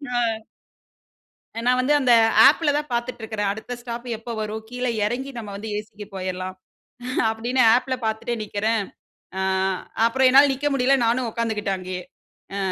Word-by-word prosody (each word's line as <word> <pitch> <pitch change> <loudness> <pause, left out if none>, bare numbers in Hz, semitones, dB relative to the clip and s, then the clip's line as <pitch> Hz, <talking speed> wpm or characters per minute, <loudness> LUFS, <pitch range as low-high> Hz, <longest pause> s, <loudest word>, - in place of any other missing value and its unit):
அ. - - +2 1.4
அ - - -1
நான் 250 +1 +3
வந்து 275 +4 +2
அந்த 255 -3 +4 0.3
ஆப்ல 300 0 +3
தான் 300 0 -4
பாத்துட்டு 240 0 -3
இருக்கிறேன், 210 -2 -2
அடுத்த 220 +4 -6
ஸ்டாப் 240 0 -7
எப்ப 230 +2 -8
வரும்? 215 +1 -4
கீழ 250 +1 -4 0.2
எறங்கி 255 +6 -3
நம்ம 215 -3 -6
வந்து 215 +2 -6
ஏசிக்கு 210 0 -8
போயிறலாம் 185 0 -4 0.7
அப்டின்னு 240 +4 0
ஆப்ல 255 +1 0
பாத்துட்டே 220 +2 -2
நிக்கறேன். 210 +1 -1 0.6
ஆ - - 0 0.6
அப்புற 245 +3 0
என்னால 275 +2 +7
நிக்க 285 +2 -2
முடியல 270 +1 +3
நானும் 240 +2 +1
உட்காந்துட்டேன் 215 -4 -2
அங்கயே. 185 0 -5 0.5
ஆ - - -2
230 Hz, 150 wpm, -23 LUFS, 210-255 Hz, 1.4 s, என்னால